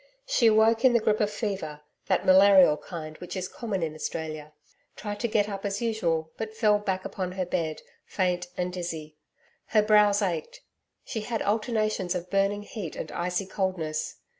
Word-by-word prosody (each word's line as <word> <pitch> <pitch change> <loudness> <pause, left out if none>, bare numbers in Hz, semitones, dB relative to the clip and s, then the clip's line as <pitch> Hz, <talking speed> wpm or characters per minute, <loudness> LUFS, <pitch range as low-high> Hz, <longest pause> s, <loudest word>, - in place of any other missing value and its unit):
She 385 - +3
awoke 225 +1 +4
in 260 -2 +6
the 235 - +5
grip 215 -1 +1
of 210 - +2
fever 195 -9 -4 0.3
that - - +1
malarial 190 -4 +7
kind 155 0 -8
which 180 - -7
is 185 -1 -3
common 200 -6 -3
in 155 -2 -2
Australia 155 -1 -5 0.4
tried 205 -1 -5
to 235 - 0
get 215 -2 +2
up 195 -2 -5
as 200 0 -2
usual, 170 -9 -1
but 220 0 -5
fell 210 -2 +4
back 190 -2 -2
upon 185 -2 -4
her 185 -1 -2
bed, 165 -3 -2 0.2
faint 180 -2 0
and 180 0 -2
dizzy. 160 -4 -5 0.5
Her 215 -1 +3
brows 210 -1 +4
ached. 335 - -3 0.4
She 220 - -4
had 225 +1 -2
alternations 215 -3 0
of 180 0 -5
burning 200 +1 +1
heat 205 -6 -6
and 155 - -6
icy 180 +2 -2
coldness. 185 -5 -2
195 Hz, 175 wpm, -27 LUFS, 175-215 Hz, 0.5 s, malarial